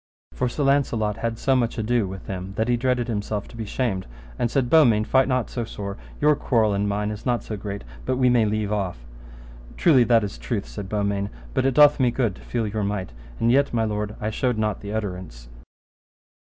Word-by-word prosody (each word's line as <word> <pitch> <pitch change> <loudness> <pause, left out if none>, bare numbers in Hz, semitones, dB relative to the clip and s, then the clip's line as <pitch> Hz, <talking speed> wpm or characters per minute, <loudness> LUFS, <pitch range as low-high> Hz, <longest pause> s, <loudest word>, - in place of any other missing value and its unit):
For 125 - -1
Sir 145 - -2
Launcelot 120 -7 +1
had 115 -1 -2
so 135 +3 +2
much 120 -2 0
ado 115 -1 +1
with 95 0 -8
him 95 0 -5
that 110 +2 0
he 120 - +3
dreaded 125 0 0
himself 105 -2 -3
to - - -13
be 115 -1 -5
shamed, 105 -4 -2 0.3
and 120 - +1
said, 130 0 +1
Beaumains, 120 -8 +5
fight 130 0 +4
not 130 -3 0
so 120 - -2
sore, 100 -3 -6 0.2
your 150 0 +4
quarrel 110 -6 +2
and 100 +1 0
mine 105 +1 -1
is 105 - -7
not 120 -1 0
so 110 - -5
great 100 0 -6 0.2
but 130 - -1
we 125 -1 +3
may 120 -3 +4
leave 105 -1 -1
off. 95 -13 -3 0.7
Truly 140 -8 +5
that 115 -2 +4
is 100 -12 -5
truth, - - -3
said 95 +11 -7
Beaumains, 100 -1 -1 0.2
but 130 - +2
it 135 - 0
doth 150 0 +7
me 125 -2 +4
good 120 -4 0
to - - -14
feel 115 -2 -2
your 105 0 -2
might, 100 -6 -2 0.3
and 115 - +3
yet, 140 -1 +3
my 115 - +2
lord, 105 -1 -2
I 110 +1 -2
showed 125 +1 0
not 105 -2 -1
the 100 - -6
utterance. 90 - -5
110 Hz, 215 wpm, -24 LUFS, 100-125 Hz, 0.7 s, doth